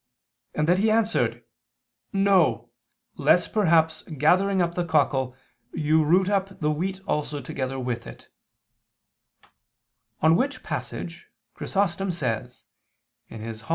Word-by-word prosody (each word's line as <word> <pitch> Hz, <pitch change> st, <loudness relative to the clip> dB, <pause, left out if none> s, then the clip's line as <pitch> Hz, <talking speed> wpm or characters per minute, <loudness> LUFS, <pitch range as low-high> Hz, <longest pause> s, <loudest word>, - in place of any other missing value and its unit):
and 150 Hz, 0 st, 0 dB
that 180 Hz, +2 st, +3 dB
he 220 Hz, +2 st, +3 dB
answered: 220 Hz, 0 st, +1 dB, 0.7 s
"No, 175 Hz, -, +2 dB, 0.5 s
lest 165 Hz, +5 st, +3 dB
perhaps 160 Hz, -6 st, +3 dB
gathering 180 Hz, +6 st, +2 dB
up 170 Hz, -1 st, +1 dB
the 175 Hz, -, -1 dB
cockle, 140 Hz, -6 st, +1 dB, 0.4 s
you 155 Hz, +1 st, +2 dB
root 180 Hz, +5 st, +3 dB
up 195 Hz, -1 st, -1 dB
the 150 Hz, -1 st, +1 dB
wheat 190 Hz, +5 st, -3 dB
also 150 Hz, -4 st, -2 dB
together 135 Hz, -1 st, -4 dB
with 120 Hz, -2 st, -4 dB
it": -, -, -12 dB, 1.9 s
on 160 Hz, +1 st, +5 dB
which 280 Hz, +8 st, -1 dB
passage -, -, -6 dB, 0.2 s
Chrysostom 195 Hz, -1 st, -1 dB
says 125 Hz, -6 st, -4 dB, 0.6 s
(Hom. 110 Hz, 0 st, -8 dB
165 Hz, 115 wpm, -25 LUFS, 145-195 Hz, 1.9 s, on